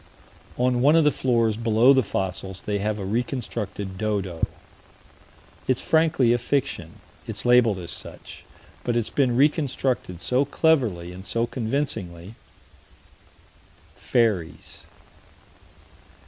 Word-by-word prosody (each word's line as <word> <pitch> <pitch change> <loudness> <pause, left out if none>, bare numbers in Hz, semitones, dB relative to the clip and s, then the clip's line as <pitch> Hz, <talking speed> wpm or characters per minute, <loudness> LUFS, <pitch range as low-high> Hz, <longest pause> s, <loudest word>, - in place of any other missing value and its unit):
On 125 0 +1
one 145 +4 +5
of 165 - +5
the 150 - +4
floors 115 -5 +1
below 115 +3 +4
the 130 - +4
fossils, 95 -3 -4
they 105 -1 -1
have 105 +1 -1
a 100 - -5
reconstructed 105 -4 -3
dodo. 100 -6 -1 1.2
It's 130 - +2
frankly 160 -7 +3
a 120 - +1
fiction: 120 - -2 0.3
it's - - -5
labeled 120 -4 +5
as 85 -2 -7
such - - -10 0.4
but 120 - -1
it's 120 -2 -1
been 125 -4 +1
reconstructed 135 - 0
so 125 +9 +1
cleverly 125 - +1
and 90 +1 -10
so 115 +4 -1
convincingly 110 - -3 1.6
Fairies. 105 -9 -1
115 Hz, 115 wpm, -24 LUFS, 95-130 Hz, 1.6 s, one